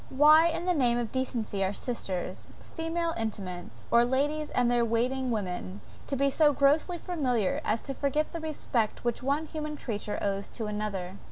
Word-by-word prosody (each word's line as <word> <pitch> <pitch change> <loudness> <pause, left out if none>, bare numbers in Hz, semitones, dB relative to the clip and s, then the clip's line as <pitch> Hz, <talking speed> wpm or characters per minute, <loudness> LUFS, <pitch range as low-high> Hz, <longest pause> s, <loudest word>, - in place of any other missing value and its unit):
Why 305 +4 +7
in 335 +1 -2
the 365 - +3
name 245 -6 +2
of 235 -2 -2
decency 235 -6 -1
are 190 +1 0
sisters, 190 -6 -4 0.3
female 330 0 -1
intimates, 190 -5 -5
or 235 0 +6
ladies 290 +5 0
and 245 -1 +2
their 240 -1 +3
waiting 250 +3 0
women, 190 -3 -3 0.3
to 275 - -1
be 275 +1 +2
so 295 0 +4
grossly 295 +6 +3
familiar 255 - 0
as 220 +1 0
to 275 - -5
forget 285 +3 0
the 335 - -3
respect 255 -8 -1
which 240 -1 -1
one 280 +4 0
human 305 -1 -5
creature 210 -5 -4
owes 200 0 -1
to 225 - -3
another? 205 -3 -3
250 Hz, 175 wpm, -29 LUFS, 215-300 Hz, 0.3 s, Why